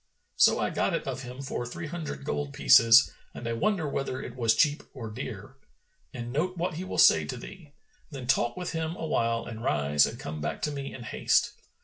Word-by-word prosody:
So - - +5
I - - 0
got - - 0
it - - -3
of 135 0 -3
him 125 +1 -8
for 135 - -3
three 125 +8 -6
hundred 155 -3 -6
gold 145 -1 -3
pieces 125 -2 +6 0.2
and 120 - -6
I 115 - -1
wonder 180 - 0
whether 135 -2 -3
it 125 - -8
was 115 -3 +2
cheap 150 +3 +3
or 115 -5 -6
dear.' 110 -1 -7 0.6
And 120 0 -6
note 180 +6 -1
what 175 0 -1
he 170 +4 -5
will 185 - -5
say - - +6
to - - -5
thee. 160 -7 -11 0.4
Then 135 -5 -7
talk 120 -2 +1
with 180 -1 -4
him 160 0 -3
awhile 115 -8 -1
and 115 0 -7
rise 75 - +3
and - - -7
come 80 -1 -6
back 75 - -4
to 150 - 0
me 140 -1 -5
in 125 - -9
haste. - - +1
135 Hz, 215 wpm, -28 LUFS, 115-155 Hz, 0.6 s, pieces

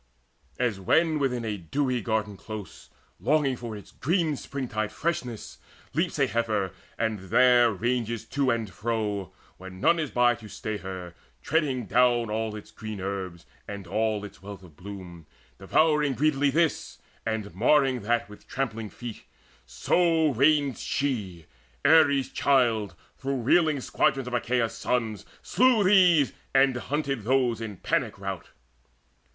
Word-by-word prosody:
As 120 -6 0
when 155 - +2
within 125 -4 -1
a 105 -2 -2
dewy 125 - -1
garden 110 -1 -1
close, 105 -1 -9 0.3
Longing 145 -3 +2
for 115 -3 -7
its 100 - -13
green 160 +1 0
springtide 120 -7 -4
freshness, 125 -9 -4 0.3
leaps - - 0
A - - +4
heifer, 110 -5 -1 0.3
and 110 -2 -1
there 125 0 +5
rangeth 115 +2 -2
to 140 -2 +1
and 115 -3 0
fro, 105 -3 -3 0.3
When 95 0 -10
none 170 - +3
is 155 -3 -2
by 120 0 +3
to 115 -2 -11
stay 110 +1 -4
her, 95 -2 -7 0.3
treading 140 -6 0
down 120 -1 +3
All 110 0 -2
its 105 - -10
green 110 -2 -7
herbs, 95 -3 -5 0.2
and 100 -2 -7
all 105 +2 -1
its 100 0 -12
wealth 100 -1 -9
of 85 -5 -16
bloom, 90 -3 -10 0.3
Devouring 150 -3 +2
greedily 145 +1 +2
this, 160 +3 0 0.3
and 110 -2 -3
marring 130 +4 +3
that 120 +3 0
With 105 0 -15
trampling 115 -5 -3
feet; 120 -1 -8 0.5
so 160 - +2
ranged 140 +1 +3
she, 105 - -2 0.4
Ares' 140 -4 +5
child, 115 -9 +2 0.2
Through 135 -2 -2
reeling 155 +2 +3
squadrons 135 -1 0
of 125 - -6
Achaea's 120 -1 0
sons, 115 -4 -2 0.2
Slew 250 -4 +3
these, 180 -7 +5 0.2
and 135 -1 +5
hunted 135 0 -2
those 125 -1 +1
in 105 -4 -6
panic 110 +3 -1
rout. 95 -2 -6
120 Hz, 140 wpm, -27 LUFS, 105-140 Hz, 0.5 s, there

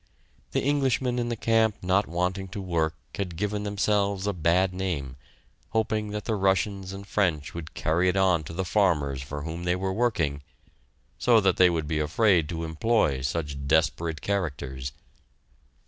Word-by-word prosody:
The - - 0
Englishmen 130 -3 +1
in 120 0 -1
the 120 - -1
camp 110 -1 +2
not 95 +3 +2
wanting 90 +3 -1
to 95 +2 -7
work 85 -4 0 0.2
had 90 -4 -4
given 105 +3 -2
themselves 100 -1 0
a 100 - 0
bad 90 +2 +2
name, 85 -9 -3 0.6
hoping 110 -1 0
that 105 0 -5
the 115 - 0
Russians 95 -1 0
and 100 0 -8
French 80 -8 0
would 85 -2 -8
carry 85 +4 +2
it 95 - 0
on 90 -4 +3
to 80 - -7
the 95 +2 -2
farmers 80 -9 +1
for 70 +1 -6
whom 80 +2 -5
they 90 0 +1
were 95 +1 -2
working, 90 -11 0 0.8
so 120 -2 +5
that 95 -2 +2
they 90 -1 +7
would 80 -3 -1
be 80 0 -1
afraid 85 +1 +3
to 85 -1 -3
employ 80 - +1
such 70 0 -3
desperate 80 +1 +1
characters. 70 -9 -3
90 Hz, 165 wpm, -27 LUFS, 80-100 Hz, 0.8 s, they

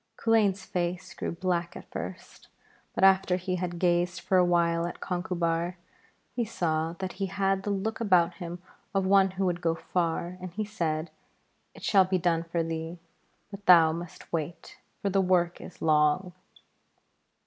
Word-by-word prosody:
Culain's 205 -4 +2
face 175 0 -3
grew - - -4
black 175 0 -2
at - - -13
first, - - -8 0.5
but - - 0
after 190 -1 +5
he 185 0 -2
had 175 -1 -3
gazed 175 0 +1
for 185 +1 +2
a - - +6
while 170 -1 +2
at 175 - -7
Conchubar, 175 -1 -1 0.6
he 240 - +1
saw 165 -6 -1
that 185 +1 -5
he 195 - +1
had 195 0 0
the 205 - -4
look 205 +2 -2
about 180 -5 +4
him 175 0 -6 0.4
of 195 -1 +2
one 195 0 +5
who 195 - +1
would 175 -1 -1
go 165 -1 +1
far, 170 +1 -2
and 180 -2 -7
he 215 +2 -2
said: 165 -6 -2 0.6
'It - - -13
shall 195 -3 +5
be 185 0 +1
done 170 -2 +1
for 165 0 -1
thee, 165 +1 -4 0.5
but 200 0 -10
thou 165 -3 +8
must 170 +1 -8
wait, 165 +1 -4 0.2
for 200 - +1
the 195 +1 +3
work 180 -2 +1
is - - -10
long.' 155 +4 +3
180 Hz, 170 wpm, -28 LUFS, 170-190 Hz, 0.6 s, thou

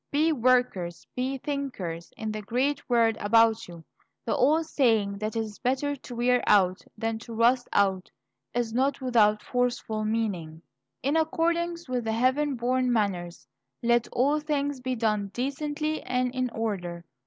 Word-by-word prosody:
Be 310 +3 +2
workers, 245 - +1
be 260 +2 -1
thinkers, 250 - -4
in 220 -1 -3
the 215 0 -4
great 255 +9 -1
world 230 -2 +3
about 225 +1 +3
you. 170 -2 -11 0.4
The 230 - 0
old 310 +5 +3
saying 220 -9 +1
that 215 +1 -3
it - - +1
is 215 -2 -7
better 270 +3 0
to 255 -2 -10
wear 245 +1 +2
out 185 -2 +4 0.2
than 225 0 -2
to 230 0 -9
rust 245 +2 +3
out 190 -2 +1 0.4
is 235 -2 -2
not 270 +3 +1
without 215 -5 +3
forceful 245 -3 -1
meaning. 190 -8 -2 0.4
In 280 +4 +1
accordance 335 +1 0
with 250 -3 -2
heaven 260 +6 +1
born 250 +1 +1
manners, 180 - -1 0.4
"let 240 0 +3
all 280 +5 +2
things 285 -2 -1
be 255 0 -2
done 215 -3 0
decently 295 +4 -2
and 250 0 -1
in 255 -1 -1
order." 180 -7 -4
240 Hz, 155 wpm, -27 LUFS, 215-270 Hz, 0.4 s, out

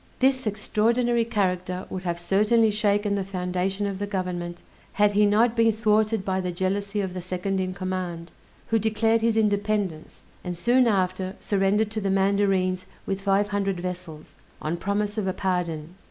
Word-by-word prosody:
This 260 -2 +2
extraordinary 230 +3 +1
character 185 -4 -1
would 185 - -4
have 175 -2 -3
certainly 215 +5 +3
shaken 205 -1 +1
the 200 -1 0
foundation 185 +1 -2
of 195 -1 -3
the 205 - -2
government, 180 -3 -4 0.3
had 210 0 +3
he 205 +1 +4
not 225 +3 +3
been 230 -1 +4
thwarted 215 -1 +1
by 190 -1 0
the 180 -1 -2
jealousy 200 +3 -1
of 190 -2 -3
the 185 - -5
second 185 +2 -2
in 185 -1 -2
command, 185 -3 -4 0.4
who 225 - +3
declared 225 +1 +2
his 225 0 +2
independence, 205 -5 -1 0.2
and 180 -1 -4
soon 245 +6 +3
after 185 -2 0
surrendered 205 +2 +1
to 215 0 -3
the 195 - -1
mandarines 190 -1 +1 0.2
with 195 0 -2
five 200 +1 +2
hundred 195 -2 -1
vessels, 175 -3 -7 0.3
on 155 +2 -2
promise 205 +3 -1
of 195 - -2
a 185 - 0
pardon. 175 -4 -2
195 Hz, 170 wpm, -25 LUFS, 185-210 Hz, 0.4 s, he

